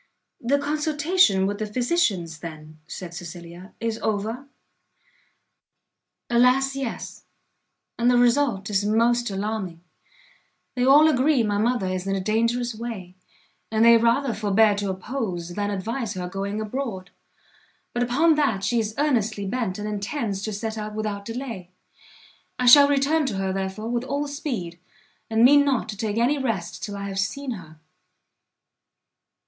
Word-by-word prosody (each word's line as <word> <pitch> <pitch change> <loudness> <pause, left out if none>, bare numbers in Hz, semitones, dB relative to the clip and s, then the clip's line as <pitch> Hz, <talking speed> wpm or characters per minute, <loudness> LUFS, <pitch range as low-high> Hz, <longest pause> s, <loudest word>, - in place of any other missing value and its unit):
"The 265 +4 +2
consultation 295 - +2
with 205 +1 -2
the 215 - -2
physicians, 210 - 0
then," 155 -1 -10
said 175 -2 -7
Cecilia, 175 +2 -9
"is 230 -1 -2
over?" 220 +5 -2 1.8
"Alas, 250 +3 +3
yes; 270 -4 -6 0.7
and 240 +1 +3
the 245 - +4
result 240 -5 +2
is 200 0 +1
most 235 +3 +2
alarming; 195 -4 -4 0.9
they 250 - -1
all 285 +4 +7
agree 275 -2 +3
my 205 -1 0
mother 235 -1 +1
is 185 0 -3
in 195 - 0
a - - -1
dangerous 230 +4 0
way, 215 -5 -7 0.6
and 220 +1 +3
they 235 0 +8
rather 235 +3 +2
forbear 215 0 +3
to 200 -1 -2
oppose, 190 -3 -4
than 205 +3 -2
advise 215 +3 -3
her 180 -1 -4
going 195 +3 -4
abroad: 215 -5 -4 0.8
but 240 - -1
upon 280 +7 +3
that 250 -11 0
she 240 +2 +1
is 215 -1 -3
earnestly 225 -8 0
bent, 195 -2 -2
and 210 0 -4
intends 210 0 -3
to 215 - -3
set 220 +2 -4
out 210 0 -6
without 210 -2 -3
delay. 230 -6 -6 0.9
I 250 - -1
shall 280 +3 +9
return 285 +2 +2
to 220 - -2
her, 190 -1 -1
therefore, 195 +3 -4
with 240 +1 -1
all 285 +2 -2
speed, 240 - -5 0.5
and 225 +1 +4
mean 285 +2 +7
not 270 -5 0
to 210 - -4
take 210 0 -3
any 255 +5 +2
rest 220 -10 -3
till 205 -1 -5
I 200 0 -5
have 195 -1 -4
seen 250 +7 -2
her." 160 -8 -9
220 Hz, 150 wpm, -24 LUFS, 195-250 Hz, 1.8 s, shall